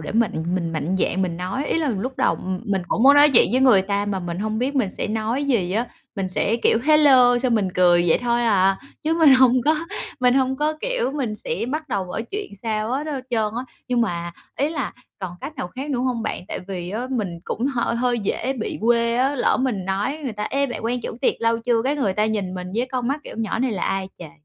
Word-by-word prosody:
để 155 - -6
mà 230 -1 +3 0.3
mình 170 -3 -2
mạnh 160 +4 -1
dạn 190 +1 0
mình 170 -2 -2
nói, 185 +10 -3
ý - - 0
là 315 -3 0
lúc 245 +3 -3
đầu 170 - +2 0.3
mình 195 -4 -1
cũng 225 - 0
muốn 280 +2 +8
nói 290 +1 +7
chuyện - - +7
với 255 - +3
người 235 -8 +6
ta 200 +1 -1
mà 195 -2 -2
mình 175 0 -5
hông 215 +2 -2
biết 265 +4 -1
mình 235 -8 +1
sẽ - - -3
nói 225 +5 -1
gì 210 -10 0
á. 230 +4 0 0.3
Mình 195 -1 -2
sẽ, 200 +4 +1
kiểu: - - +4
"Hello" 270 -5 +6
xong 245 -1 +1
mình 205 -4 +1
cười 175 -1 +4
vậy - - +4
thôi 240 0 0
à, 195 -4 +3 0.2
chứ 315 +2 +1
mình 300 -5 +7
hông 255 -1 +5
có, 310 +1 +4 0.5
mình 250 0 +4
hông 265 0 +1
có, 300 +2 +1
kiểu, - - -1
mình 250 -8 -2
sẽ 475 - -3
bắt 310 +1 -3
đầu 200 -6 -1
mở 180 +4 -4
chuyện 410 +1 -4
sao 215 -1 -2
hết 275 +4 -2
hết 285 -4 -3
trơn 220 -3 0
á. 255 - -4 0.2
Nhưng 245 -1 +1
mà 170 -6 -2 0.2
ý 285 - +1
là 285 -5 -3 0.3
còn 185 -2 -5
cách 305 - -7
nào 180 - -4
khác 270 +8 -6
nữa 260 - -1
hông 250 -3 -1
bạn? - - -4
Tại - - -4
vì 180 -2 -5
á 230 +5 -3
mình 200 -9 -2
cũng 240 - -2
h 270 -3 -2
hơi 240 +1 0
dễ 230 +5 -1
bị 235 -5 -4
quê 235 +1 +2
á, 270 +3 +2
lỡ 255 - +2
mình 220 -8 -1
nói 200 +11 -2
người 245 - -2
ta: 210 - -5
"Ê, 280 +1 +1
bạn 245 -3 -6
quen 245 +2 -1
chủ 225 - -6
tiệc - - +2
lâu 230 0 +2
chưa?" 230 -1 +1
Cái 280 +3 0
người 215 -9 0
ta 210 +2 +1
nhìn 200 -4 -2
mình 180 -1 -5
với 240 +3 0
con 250 -1 -1
mắt, 290 +2 -1
kiểu: - - -9
"Nhỏ 225 0 -2
này 255 -2 0
là 190 - -4
ai 195 -1 -1
trời." 165 -4 -9
235 Hz, 260 wpm, -22 LUFS, 195-265 Hz, 0.5 s, muốn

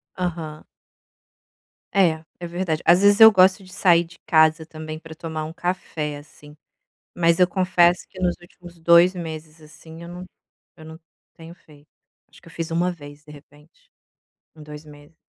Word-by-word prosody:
Aham. 165 -4 -5 1.3
É, 165 -5 +2 0.2
é 175 - -6
verdade. 170 -2 -3
Às 175 +3 +5
vezes 205 +1 +4
eu 220 0 +10
gosto 190 0 +3
de 185 - -16
sair 170 -3 +3
de 170 0 -17
casa 160 0 +3
também 155 0 -9
pra 160 -1 -12
tomar 160 -1 -6
um 160 - -9
café, 165 -4 -4
assim. 150 0 -16 0.6
Mas 170 0 +2
eu 180 - +5
confesso 180 -1 +2
que 185 - -14
nos 180 -1 0
últimos 175 0 -16
2 170 +2 +4
meses, 160 -2 -8
assim, 160 +2 -14
eu 170 - -10
não 180 +1 -9 0.5
eu 160 - -14
não 160 +1 -12 0.3
tenho 165 +1 -13
feito, 150 -4 -22 0.4
acho - - -20
que - - -17
eu - - -16
fiz 165 -1 -5
1 175 +2 0
vez, 145 -3 -14
de 150 - -14
repente, 145 +1 -20 0.6
em 155 - -15
2 150 0 -11
meses. 145 +1 -17
165 Hz, 175 wpm, -22 LUFS, 155-175 Hz, 1.3 s, eu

